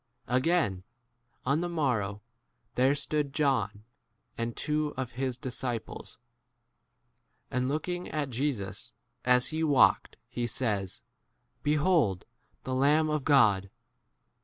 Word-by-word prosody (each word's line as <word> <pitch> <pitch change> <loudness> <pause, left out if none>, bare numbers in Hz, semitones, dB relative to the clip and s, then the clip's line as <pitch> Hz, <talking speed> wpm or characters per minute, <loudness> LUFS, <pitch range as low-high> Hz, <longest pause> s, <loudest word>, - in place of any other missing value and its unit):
35 125 - +1
Again, 130 - +1 0.6
on 140 +5 +2
the 175 - -2
morrow, 115 -11 -1 0.5
there 130 +3 +3
stood 145 -1 -1
John 110 -9 +1 0.5
and 115 0 -3
two 150 0 -1
of 130 -2 -3
his 130 0 -2
disci 125 -1 -2
30 - - -5
pies. - - -9 1.3
And, 125 +1 0
looking 175 +5 -2
at 145 -3 -2
Jesus 120 -6 -3 0.3
as 125 0 +4
he 160 +1 -1
walked, 145 -5 +4
he 120 -1 -3
says, 105 -6 -2 0.6
Behold 150 - +2 0.4
the 130 - -3
Lamb 150 +4 +3
37 150 - +1
of 150 - -2
God. 105 -10 +4
130 Hz, 125 wpm, -29 LUFS, 115-150 Hz, 1.3 s, as